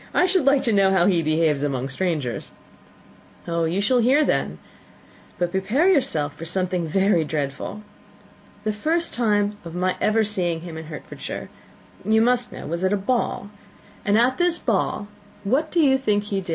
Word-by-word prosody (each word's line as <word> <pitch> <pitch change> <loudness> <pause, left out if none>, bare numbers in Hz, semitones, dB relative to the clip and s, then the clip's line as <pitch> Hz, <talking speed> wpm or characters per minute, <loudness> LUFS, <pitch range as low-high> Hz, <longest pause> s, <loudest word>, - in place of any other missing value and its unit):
"I 360 - +5
should 370 -5 +2
like 275 0 +4
to 230 - +1
know 195 -1 +4
how 190 -2 +3
he 180 -4 +3
behaves 155 -2 +1
among 135 -3 -1
strangers." 150 -4 -3 0.9
"You 170 +1 -1
shall 245 +5 +2
hear, 270 +6 +4
then - - -1 0.8
but 175 -1 -1
prepare 245 - +2
for 150 - -2
something 180 0 -1
very 190 0 +2
dreadful. 150 +7 -4 0.8
The 215 0 -1
first 325 +10 0
time 205 -3 +1
of 170 0 -8
my 185 +1 0
ever 220 +1 +3
seeing 180 -6 -1
him 170 -1 -8
in 160 0 -7
Hertfordshire, 155 -1 -8 0.5
you 220 +2 +3
must 245 +1 +2
know, - - -8
was 170 +3 -3
at 190 +1 +2
a - - +2
ball 205 -1 -1 0.5
and 205 +1 +2
at 250 +5 +2
this 350 -1 +2
ball, 205 - -1 0.4
what 275 +10 +1
do 345 - 0
you 270 -4 +4
think 210 -5 +1
he 200 -2 -2
did? 180 - -12
200 Hz, 170 wpm, -23 LUFS, 170-240 Hz, 0.9 s, I